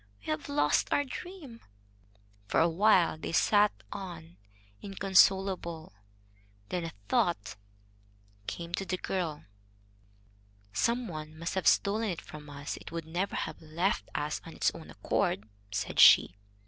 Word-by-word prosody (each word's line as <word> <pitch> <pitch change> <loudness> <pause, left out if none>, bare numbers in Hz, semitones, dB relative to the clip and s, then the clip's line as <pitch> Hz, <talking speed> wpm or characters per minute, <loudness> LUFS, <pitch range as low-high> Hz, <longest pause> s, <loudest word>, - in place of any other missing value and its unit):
"We - - -20
have 155 -1 -3
lost 145 +1 +2
our 285 - +3
dream." 285 -3 -9 0.9
For - - +2
a 165 - +5
while 175 -2 +3
they - - -5
sat 210 +3 +4 0.2
on, 170 -3 -8 0.4
inconsolable. 190 - +2 0.8
Then 175 -2 -2
a 165 - -5 0.2
thought 100 +1 0 0.9
came 170 0 -6
to 195 - -2
the 185 - -1
girl. 170 -6 -3 1.3
"Some 235 - +1
one 155 -2 -7
must 165 +1 -4
have 190 - -1
stolen 215 +2 +3
it 175 - -3
from 150 -1 -11
us. 145 0 -6
It - - -11
would 165 -1 -5
never 175 +5 -2
have - - -4
left 170 +7 -1
us 150 +1 -2
of 165 - -10
its - - +2
own - - -11
accord," 105 - -1 0.2
said 105 +1 -3
she. 90 - +8
170 Hz, 140 wpm, -30 LUFS, 155-195 Hz, 1.3 s, she